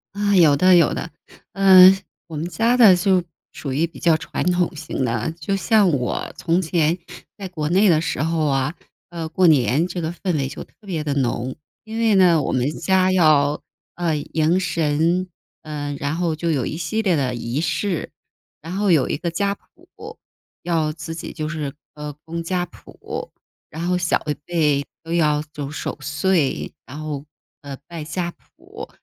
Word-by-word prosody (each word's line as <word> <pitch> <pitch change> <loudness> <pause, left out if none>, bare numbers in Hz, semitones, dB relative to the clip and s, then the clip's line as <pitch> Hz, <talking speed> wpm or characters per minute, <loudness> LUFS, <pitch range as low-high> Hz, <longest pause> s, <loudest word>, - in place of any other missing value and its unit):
啊， 205 0 +1
有 155 -6 +6
的， 185 +2 +6
有 170 - +4
的。 - - -4 0.4
呃， 190 -1 +8 0.3
我 165 - -8
们 155 +3 -3
家 230 +6 +2
的 220 -7 +8
就 185 0 +2 0.3
属 140 - -5
于 155 +5 +1
比 165 - -14
较 165 -2 +3
传 - - -4
统 180 0 0
型 150 -4 -3
的。 115 +5 -1
就 195 +5 -1
像 205 -1 +3
我 125 -5 -2
从 170 +2 +1
前 165 -1 +1 0.4
在 195 - -6
国 155 -5 -3
内 195 +4 +4
的 160 -3 +4
时 165 -5 -2
候 160 0 0
啊， 135 +2 0 0.3
呃， 165 -2 -5
过 180 +3 +3
年 150 +1 +3
这 180 -1 -4
个 160 0 -2
氛 175 0 -3
围 135 -3 -1
就 140 - -7
特 - - -32
别 170 -6 -3
的 145 -2 -1
浓。 130 -1 -1 0.3
因 220 +1 -6
为 225 -2 +3
呢， 175 -4 +5
我 - - -1
们 130 +2 +1
家 185 +4 +2
要， 155 -5 +3 0.3
呃， 170 -3 0
迎 160 +4 +1
神。 165 +1 0 0.4
呃， 145 -2 -4
然 145 +3 -2
后 170 -2 0
就 170 +2 -2
有 140 -6 0
一 - - -4
系 170 +7 -2
列 185 -5 +2
的 130 -4 -1
仪 120 +4 -3
式。 180 0 -2 0.5
然 165 +3 -7
后 200 -1 +2
有 150 -6 +4
一 - - -1
个 170 +2 -3
家 200 +3 0
谱， - - -15 0.4
要 160 -3 0
自 160 +1 -7
己 165 - -6
就 155 -2 -4
是， 150 -4 -4 0.2
呃， 150 0 -6
供 170 +1 -4
家 180 +1 -1
谱。 - - -9 0.4
然 165 +2 -5
后 180 0 +2
小 175 -1 +1
一 150 - +1
辈 150 -5 +1 0.2
都 165 0 -5
要 150 -3 +2
走 145 -1 -5
守 150 - -5
岁， 155 +1 0
然 140 +3 -9
后， 150 -2 -5 0.4
呃， 140 -2 -8
拜 170 -2 -7
家 175 +2 -3
谱， 405 - -13
165 Hz, 200 characters per minute, -21 LUFS, 150-180 Hz, 0.5 s, 呃